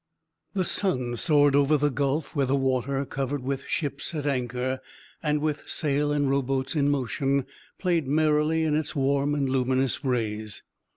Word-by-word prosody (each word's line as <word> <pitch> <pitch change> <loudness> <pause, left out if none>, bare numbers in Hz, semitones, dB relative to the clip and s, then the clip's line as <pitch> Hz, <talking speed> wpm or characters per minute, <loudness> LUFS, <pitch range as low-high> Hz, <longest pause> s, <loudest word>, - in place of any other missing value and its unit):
The 190 - +2
sun 130 -11 -1
soared 145 +1 +4
over 145 +2 +4
the 145 0 +1
gulf, 140 +3 -1
where 140 -2 +1
the 135 - +2
water, 135 +1 0
covered 135 0 -3
with 135 +1 -3
ships 145 +2 -3
at 150 -2 -3
anchor, 130 -1 -1 0.4
and 150 -2 0
with 150 -1 -2
sail 145 -1 +1
and 145 -1 +1
row 140 +1 +2
boats 130 0 -2
in 145 -1 +2
motion, 135 0 0 0.3
played 170 -6 0
merrily 155 +2 +2
in 155 -2 +1
its 155 -1 -1
warm 140 +1 +1
and 140 -2 0
luminous 130 +1 0
rays. 110 -5 -2
140 Hz, 165 wpm, -26 LUFS, 130-150 Hz, 0.4 s, soared